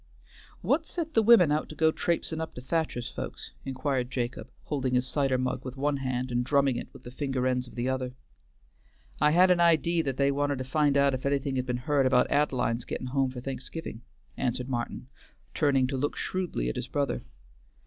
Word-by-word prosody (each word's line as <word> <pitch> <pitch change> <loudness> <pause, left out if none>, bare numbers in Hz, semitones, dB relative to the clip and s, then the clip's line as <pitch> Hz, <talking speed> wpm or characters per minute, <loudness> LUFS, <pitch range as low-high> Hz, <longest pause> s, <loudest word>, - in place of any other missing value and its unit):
"What 320 0 +1
set 325 -3 -4
the 225 - +5
women 215 -8 +6
out 150 +1 0
to 155 - -8
go 160 +1 +4
traipsin' 160 -1 -1
up 160 - -6
to 125 - -7
Thacher's 130 -3 -1
folks?" - - -7
inquired 130 -1 -1
Jacob, 125 -2 -3
holding 130 -4 -1
his 125 0 +2
cider 135 -1 +1
mug 130 0 -2
with 130 +1 -7
one 145 +1 +1
hand 130 -1 -2
and 120 0 +1
drumming 140 0 +2
it - - -6
with - - -14
the 120 - -9
finger 135 -1 -2
ends 125 -1 0
of - - -14
the 120 +1 -1
other. 130 -1 -2 1.0
"I 150 - +5
had 180 +4 +5
an 180 - +4
idee 170 0 +4
that 135 -4 -3
they 140 0 +3
wanted 145 0 0
to 130 - -3
find 140 +1 +2
out 140 -1 +4
if 130 - -3
anything 140 -1 0
had 130 0 -1
been 125 -1 -1
heard 135 +1 +2
about 125 -1 +3
Ad'line's 125 -5 +1
getting - - -5
home 135 -1 +2
for 125 -1 -7
Thanksgiving," 130 -1 -6 0.4
answered 125 +1 -1
Martin, 120 0 -3 0.5
turning 140 -4 +3
to 135 +1 -2
look 145 +3 -1
shrewdly 180 - -2
at 60 - -2
his - - -3
brother. 140 -1 -1
135 Hz, 205 wpm, -28 LUFS, 125-150 Hz, 1.0 s, women